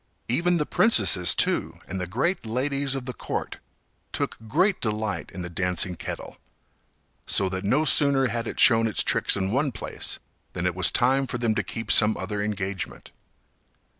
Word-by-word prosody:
Even 175 +9 +1
the 150 - -1
princesses, 95 - +4
too, - - +1
and 95 +1 -5
the 90 - -3
great 135 - -1
ladies 135 +4 -1
of 135 -2 -5
the 125 - -5
court, - - -5 0.5
took - - -3
great 180 - +1
delight 110 -1 -3
in 90 - -7
the - - -4
dancing 90 +1 0
kettle, - - -8 0.9
so 100 - +3
that 95 +1 -4
no 135 +10 +1
sooner 140 -3 +4
had 115 -1 -3
it - - -6
shown 115 -2 +5
its 110 - 0
tricks - - +2
in 95 0 -2
one 135 +3 0
place 110 - -5 0.4
than 85 - -4
it 90 - 0
was 90 -2 +5
time 130 +6 +2
for 125 - -4
them 120 -2 0
to - - -1
keep 115 -2 -5
some 110 0 +4
other 105 -1 -4
engagement. 100 -3 -5
115 Hz, 175 wpm, -24 LUFS, 95-135 Hz, 0.9 s, shown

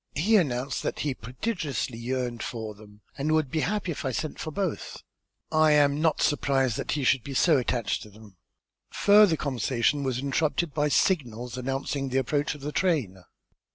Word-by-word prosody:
He 200 +10 +3
announced 135 - +1
that - - -3
he 145 -2 -1
prodigiously 130 - -4
yearned 120 -1 -3
for 110 -2 -5
them 105 0 -17 0.2
and 155 +3 +1
would 155 -4 +1
be 160 - 0
happy 200 +1 -1
if 155 - -5
I 130 - -1
sent 150 +5 -4
for - - -4
both. 185 +2 -4 0.5
I 155 -1 +4
am 145 0 +3
not 160 -1 +2
surprised 135 -5 +1
that - - -2
he 145 - -1
should 130 -1 +3
be 135 +2 -6
so 160 +2 +4
attached 120 -2 -1
to 105 - -11
them." 105 -1 -16 0.5
Further 205 -5 +5
conversation 130 0 0
was 130 -3 -1
interrupted 150 +4 0
by 150 -1 +1
signals 125 - 0
announcing 135 +2 -3
the 130 - -1
approach 145 +3 0
of 145 - -12
the 145 +2 -4
train. 140 - 0
140 Hz, 180 wpm, -27 LUFS, 125-155 Hz, 0.5 s, Further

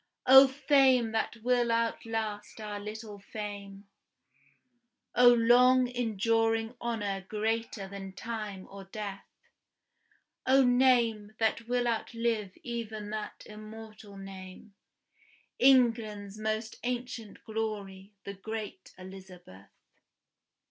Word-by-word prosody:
O 265 +1 +9
fame 265 -4 +3
that 225 +1 -1
will 245 -1 +2
outlast 225 -2 -2
our 210 -1 -5
little 210 0 -8
fame! 200 -1 -8 1.3
O 245 0 +7
long 250 +2 +5
enduring 225 -1 0
honor 205 -5 -2
greater 220 -1 -2
than 195 0 -8
time 210 -3 -6
or 195 0 -9
death! 200 0 -7 1.2
O 265 +1 +6
name 240 -4 +3
that 225 +1 0
will 245 0 0
outlive 230 -3 -2
even 220 -3 -5
that 215 -1 -6
immortal 215 -1 -11
name, 195 +1 -10 0.9
England's 225 -6 +3
more 215 0 0 0.2
ancient 245 -3 -5
glory, 205 -3 -5
the 200 - -6
great 210 -1 -7
Elizabeth! 185 - -12
220 Hz, 95 wpm, -30 LUFS, 205-235 Hz, 1.3 s, O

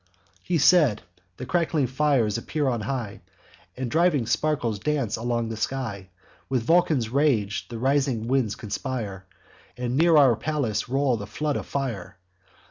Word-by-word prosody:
"He 175 - 0
said. 150 - +4 0.3
The 130 - -6
crackling 165 -1 +1
flames 130 -5 +1
appear 145 +4 -2
on 120 -4 0
high. 115 -2 -4 0.6
And 125 -2 -3
driving 160 -6 +2
sparkles 120 -5 0
dance 135 -2 -1
along 120 0 -2
the 115 - -4
sky. 110 -6 -4 0.4
With 130 -3 0
Vulcan's 155 -5 +2
rage 120 -7 +1
the 115 - -7
rising 130 -2 0
winds 125 -5 +1
conspire, 105 -4 -5 0.5
And 125 0 -2
near 165 0 +5
our 135 -5 +6
palace 135 -6 -2
roll 135 -2 +1
the 105 -1 -7
flood 145 +8 -2
of - - -4
fire. 105 -9 -4
130 Hz, 145 wpm, -25 LUFS, 110-145 Hz, 0.6 s, our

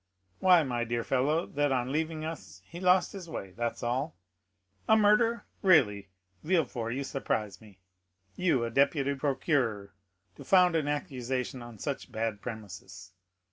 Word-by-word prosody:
why, 180 -3 +6
my 120 -4 -2
dear 120 0 -2
fellow, 145 +7 +1
that 145 0 0
on 125 -1 0
leaving 155 +1 -2
us 95 - -8
he 170 - -10
lost 185 0 +3
his 185 -4 -9
way, 95 -11 -6
that's 115 +3 -4
all. 130 +6 -1 0.7
A 220 - +6
murder? 220 +3 +3 0.2
really, 105 - +4 0.3
Villefort, 125 -9 0
you 140 - -2
surprise 105 -8 -3
me. 105 -3 -16 0.6
You, 155 -10 +1
a 115 - -4
deputy 140 +2 +2
procureur, 135 -7 -1 0.4
to - - -10
found 180 -3 +4
an 155 -3 0
accusation 130 -3 -3
on 120 -2 -10
such 135 +3 -5
bad 110 -2 -3
premises! 100 -4 -9
135 Hz, 145 wpm, -29 LUFS, 115-160 Hz, 0.7 s, why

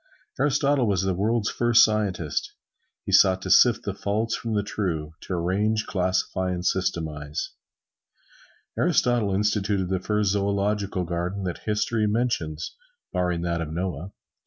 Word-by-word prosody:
Aristotle 140 -3 +2
was 95 -2 +1
the 95 -1 +1
world's 105 +4 0
first 120 0 +5
scientist. 100 -7 -2 0.5
He - - -3
sought 95 -1 +5
to - - -2
sift - - +5
the - - -3
false 110 +3 -1
from 115 -2 -3
the 105 - +1
true 80 -7 -3
to - - -5
arrange, 100 +5 0
classify 95 0 -1
and 90 -1 -3
systematize. 80 -6 -2 1.2
Aristotle 120 -5 +2
instituted 100 -1 0
the 95 -1 0
first 105 +1 0
zoological 100 -1 0
garden 90 +3 -3
that 90 -2 -4
history 105 +1 0
mentions, 105 -9 -2 0.4
barring 90 -2 0
that 85 -1 -1
of 80 -2 -4
Noah. 90 +1 -4
95 Hz, 135 wpm, -25 LUFS, 90-105 Hz, 1.2 s, first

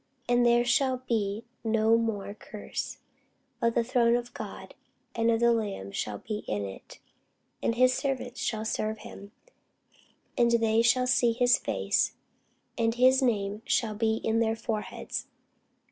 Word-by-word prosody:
And 245 0 +3
there 240 0 +4
shall 255 +1 +1
be 215 -1 -1 0.2
no 225 0 +3
more 220 -3 -1
curse: 210 0 -6 0.6
but 230 0 +1
the 235 - +3
throne 235 -1 +3
of 240 0 -3
God - - -8 0.4
and 230 0 +1
of 225 -1 +3
the 235 0 +5
Lamb 200 - -3
shall 105 +1 -3
be 210 - -5
in 105 -1 -2
it; 95 -1 -10 0.6
and 230 - 0
his 255 +1 +4
servants 255 -2 -3
shall 220 -1 -2
serve 220 0 -2
him: 200 -1 -11 1.0
and 240 -1 +3
they 225 -1 +3
shall 250 +2 +3
see 240 -2 +3
his 245 +1 +3
face; - - 0 0.7
and 225 0 +1
his 260 +2 +5
name 210 -4 0
shall 220 -3 +1
be 220 +1 +1
in 225 0 +1
their 225 -1 +1
foreheads. 220 -1 -4
230 Hz, 150 wpm, -28 LUFS, 215-240 Hz, 1.0 s, the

